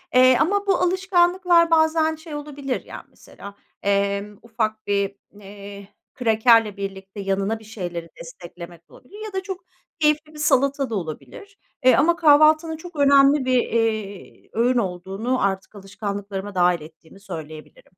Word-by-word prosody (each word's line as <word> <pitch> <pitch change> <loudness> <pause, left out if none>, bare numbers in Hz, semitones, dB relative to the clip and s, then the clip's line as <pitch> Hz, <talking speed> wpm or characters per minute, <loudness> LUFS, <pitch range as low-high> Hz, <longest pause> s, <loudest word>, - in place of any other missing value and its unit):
eee, 255 -1 +6
ama 405 +4 +1
bu 390 - +4
alışkanlıklar 360 -2 +2
bazen 315 0 +3
şey 315 -1 -10
olabilir, 285 -3 -5
yani - - -10
mesela, 200 0 -13 0.3
emm, 200 +1 -1
ufak 220 -2 -3
bir, 200 -1 0 0.2
eee, 200 0 -11 0.3
krakerle 225 -3 +3
birlikte 195 0 -7
yanına 195 +3 -1
bir - - -16
şeyleri 175 -6 -6
desteklemek 170 0 -11
olabilir 415 +11 -12
ya 425 - -8
da 380 0 -3
çok 380 -3 -7 0.4
keyifli 305 0 +1
bir 300 - -11
salata 275 -2 +1
da 225 - -3
olabilir, 200 - -8 0.3
eee, 255 - +7
ama 335 +5 +3
kahvaltının 310 0 +4
çok 345 +1 -12
önemli 280 -1 +4
bir, 255 -1 +3
eee, 220 -4 -3
öğün 245 +3 +2
olduğunu 195 +4 -2
artık 195 +1 -2
alışkanlıklarıma 200 0 -6
dâhil 175 -2 +2
ettiğimi 160 +4 -15
söyleyebilirim. 160 -5 -10
225 Hz, 140 wpm, -22 LUFS, 195-305 Hz, 0.4 s, eee